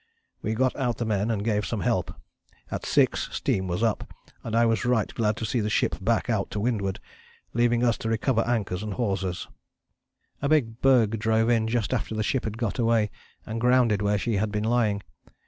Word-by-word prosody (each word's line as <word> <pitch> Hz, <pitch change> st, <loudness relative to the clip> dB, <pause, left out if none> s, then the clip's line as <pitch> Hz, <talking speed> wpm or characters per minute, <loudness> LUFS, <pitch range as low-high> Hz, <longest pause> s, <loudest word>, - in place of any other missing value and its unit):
"We 110 Hz, -, -2 dB
got 130 Hz, +2 st, +1 dB
out 125 Hz, -3 st, -1 dB
the 120 Hz, -, -2 dB
men 105 Hz, 0 st, 0 dB
and 105 Hz, -3 st, -1 dB
gave 105 Hz, -2 st, +1 dB
some 110 Hz, -2 st, -3 dB
help. -, -, 0 dB, 0.6 s
At -, -, -4 dB
6 -, -, +2 dB
steam 95 Hz, -1 st, -1 dB
was 90 Hz, +5 st, -1 dB
up, 115 Hz, -2 st, -1 dB, 0.3 s
and 115 Hz, -, -3 dB
I 115 Hz, 0 st, +5 dB
was 115 Hz, -1 st, +1 dB
right 120 Hz, -3 st, +1 dB
glad 110 Hz, -2 st, 0 dB
to 115 Hz, -, -3 dB
see 120 Hz, +3 st, 0 dB
the 105 Hz, -1 st, -1 dB
ship -, -, +1 dB
back -, -, +1 dB
out -, -, 0 dB
to 105 Hz, -, -4 dB
windward, 100 Hz, -3 st, -1 dB, 0.5 s
leaving 120 Hz, 0 st, +2 dB
us 120 Hz, -2 st, +2 dB
to 115 Hz, -, -3 dB
recover 115 Hz, +1 st, +1 dB
anchors 105 Hz, -6 st, -1 dB
and 105 Hz, -2 st, -4 dB
hawsers." 95 Hz, -6 st, -2 dB, 0.9 s
A 140 Hz, -, 0 dB
big 120 Hz, -7 st, +1 dB
berg 115 Hz, -5 st, +4 dB
drove 110 Hz, +1 st, +2 dB
in 115 Hz, -2 st, +2 dB
just 115 Hz, 0 st, 0 dB
after 110 Hz, -2 st, -2 dB
the 110 Hz, -, 0 dB
ship 130 Hz, +4 st, -1 dB
had 110 Hz, 0 st, -4 dB
got 115 Hz, +1 st, -2 dB
away, 115 Hz, -3 st, +2 dB, 0.3 s
and 115 Hz, +1 st, -4 dB
grounded 125 Hz, -4 st, +3 dB
where 105 Hz, 0 st, +2 dB
she 110 Hz, +1 st, -1 dB
had 105 Hz, +1 st, 0 dB
been 105 Hz, 0 st, -1 dB
lying. 110 Hz, -3 st, +1 dB
110 Hz, 205 wpm, -26 LUFS, 105-120 Hz, 0.9 s, I